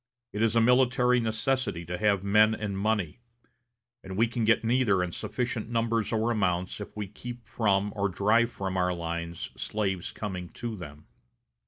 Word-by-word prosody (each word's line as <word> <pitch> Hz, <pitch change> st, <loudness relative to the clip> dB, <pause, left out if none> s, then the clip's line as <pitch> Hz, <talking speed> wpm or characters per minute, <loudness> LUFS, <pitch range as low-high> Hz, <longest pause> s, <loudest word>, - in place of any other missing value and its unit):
It 105 Hz, -, -2 dB
is 115 Hz, 0 st, +2 dB
a 115 Hz, -, +5 dB
military 125 Hz, +1 st, +4 dB
necessity 110 Hz, -5 st, -1 dB
to 90 Hz, +2 st, -4 dB
have 100 Hz, -1 st, +2 dB
men 105 Hz, +2 st, +4 dB
and 105 Hz, -2 st, -4 dB
money; 100 Hz, -2 st, -1 dB, 0.8 s
and 95 Hz, 0 st, -7 dB
we 115 Hz, -, +5 dB
can 115 Hz, -1 st, -2 dB
get 115 Hz, +1 st, +3 dB
neither 115 Hz, -5 st, +2 dB
in 90 Hz, -, -3 dB
sufficient 120 Hz, +3 st, -3 dB
numbers 115 Hz, -1 st, 0 dB
or 115 Hz, +1 st, +1 dB
amounts 95 Hz, -3 st, 0 dB
if 105 Hz, -, -9 dB
we 105 Hz, -2 st, -3 dB
keep 120 Hz, +4 st, -9 dB
from 100 Hz, -2 st, +1 dB
or 100 Hz, -1 st, 0 dB
drive 110 Hz, +6 st, +2 dB
from 95 Hz, -3 st, -3 dB
our 90 Hz, -1 st, +1 dB
lines 85 Hz, 0 st, -4 dB
slaves 95 Hz, -4 st, -2 dB
coming 90 Hz, -4 st, -5 dB
to 120 Hz, -2 st, -5 dB
them. 75 Hz, -5 st, -10 dB
105 Hz, 170 wpm, -28 LUFS, 95-115 Hz, 0.8 s, a